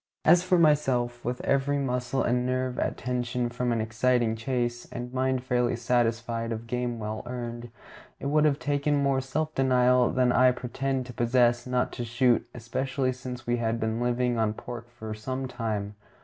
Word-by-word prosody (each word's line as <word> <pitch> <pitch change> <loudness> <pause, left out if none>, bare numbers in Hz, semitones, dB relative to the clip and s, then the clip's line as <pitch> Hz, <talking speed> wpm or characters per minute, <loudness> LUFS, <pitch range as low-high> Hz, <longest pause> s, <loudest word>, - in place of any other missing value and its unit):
As 175 +2 +7
for 180 0 +2
myself, 130 -7 +2
with 125 +1 -2
every 140 +1 +1
muscle 125 -1 -1
and 125 +1 +1
nerve 130 0 -1
at - - -1
tension 125 0 -2
from 125 0 -1
an 115 - +1
exciting 115 +1 +1
chase, 120 +1 -2
and 125 0 -6
mind 130 -1 0
fairly 125 -2 +1
satisfied 115 -1 0
of 115 0 -4
game 125 0 -2
well 110 0 -4
earned, 120 -1 -5 0.5
it - - -7
would 150 +2 +3
have 145 -2 +3
taken 145 0 0
more 140 -2 +2
self 155 +4 -2
denial 125 -2 +4
than 125 -1 +2
I 125 +1 +5
pretend 130 +1 -2
to 125 - -9
possess 120 +1 +2
not 125 0 0
to 120 - -5
shoot, 120 +1 +2
especially 130 +2 -2
since 125 -1 -7
we 120 0 +1
had 115 0 -1
been 110 +1 -1
living 120 -1 +1
on 110 -1 +1
pork 120 0 -8
for 110 -3 -7
some 130 +5 -4
time. 110 -4 -3
125 Hz, 175 wpm, -27 LUFS, 120-130 Hz, 0.5 s, As